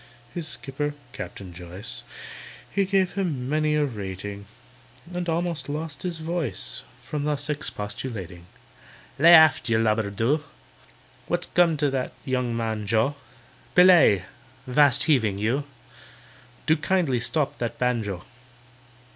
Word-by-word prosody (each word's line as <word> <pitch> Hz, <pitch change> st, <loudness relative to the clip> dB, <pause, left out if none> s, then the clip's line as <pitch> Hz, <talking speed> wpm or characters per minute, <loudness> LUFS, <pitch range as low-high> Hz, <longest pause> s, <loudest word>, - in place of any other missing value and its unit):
His 170 Hz, -3 st, -4 dB
skipper 145 Hz, +2 st, -4 dB, 0.2 s
(CAPTAIN 90 Hz, 0 st, -8 dB
JOYCE), 90 Hz, +4 st, -6 dB, 0.7 s
He 200 Hz, -1 st, +1 dB
gave 190 Hz, -1 st, +1 dB
him 155 Hz, -11 st, -2 dB
many 155 Hz, +1 st, +1 dB
a 150 Hz, -1 st, +3 dB
rating, 100 Hz, -3 st, -6 dB, 0.7 s
And 175 Hz, -1 st, -2 dB
almost 170 Hz, -2 st, -1 dB
lost 150 Hz, +1 st, -4 dB
his 175 Hz, -3 st, -3 dB
voice 155 Hz, -, -3 dB, 0.2 s
From 150 Hz, -1 st, -3 dB
thus 150 Hz, 0 st, 0 dB
expostulating: 105 Hz, -, -5 dB, 0.7 s
"Lay 170 Hz, +3 st, +9 dB
aft, 160 Hz, -6 st, +6 dB
you 115 Hz, -, +3 dB
lubber, 110 Hz, -1 st, +1 dB
do! 120 Hz, +9 st, 0 dB, 0.8 s
What's -, -, 0 dB
come 170 Hz, -3 st, +3 dB
to 145 Hz, -1 st, +1 dB
that 130 Hz, -1 st, -2 dB
young 125 Hz, -3 st, -1 dB
man, 110 Hz, -2 st, -2 dB
JOE? 115 Hz, +6 st, +2 dB, 0.6 s
Belay!—'vast 130 Hz, -, +4 dB
heaving! 115 Hz, -, +2 dB
you! 120 Hz, +8 st, 0 dB, 1.0 s
Do 160 Hz, +1 st, +4 dB
kindly 150 Hz, -5 st, +1 dB
stop 140 Hz, +4 st, -1 dB
that 120 Hz, -1 st, -3 dB
banjo! 110 Hz, -7 st, -1 dB
130 Hz, 120 wpm, -25 LUFS, 110-155 Hz, 1.0 s, Lay